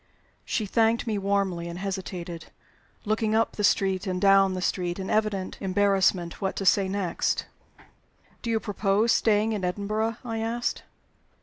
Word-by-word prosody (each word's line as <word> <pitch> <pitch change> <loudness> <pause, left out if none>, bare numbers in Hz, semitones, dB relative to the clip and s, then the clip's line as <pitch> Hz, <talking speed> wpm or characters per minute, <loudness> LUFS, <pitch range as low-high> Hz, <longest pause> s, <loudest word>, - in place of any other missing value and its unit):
She 220 - -1
thanked 225 +3 +2
me 215 -3 -1
warmly, 195 -3 0
and 170 0 -6
hesitated, 185 -3 -5 0.6
looking 215 0 +1
up 225 +1 +2
the 210 - -4
street 195 -1 +2
and 180 -1 -1
down 195 -1 +5
the - - -3
street 175 -2 -1
in 190 -1 -4
evident 210 -3 -1
embarrassment 190 -2 +1
what 190 -1 -1
to 195 - -3
say 195 0 +4
next. 195 -3 -1 1.0
"Do 235 - -4
you 225 -1 +2
propose 205 +2 +1
staying 220 0 +2
in 205 -3 -3
Edinburgh?" 215 +4 -1
I 225 -2 -3
asked. 230 +2 -2
200 Hz, 150 wpm, -26 LUFS, 190-215 Hz, 1.0 s, down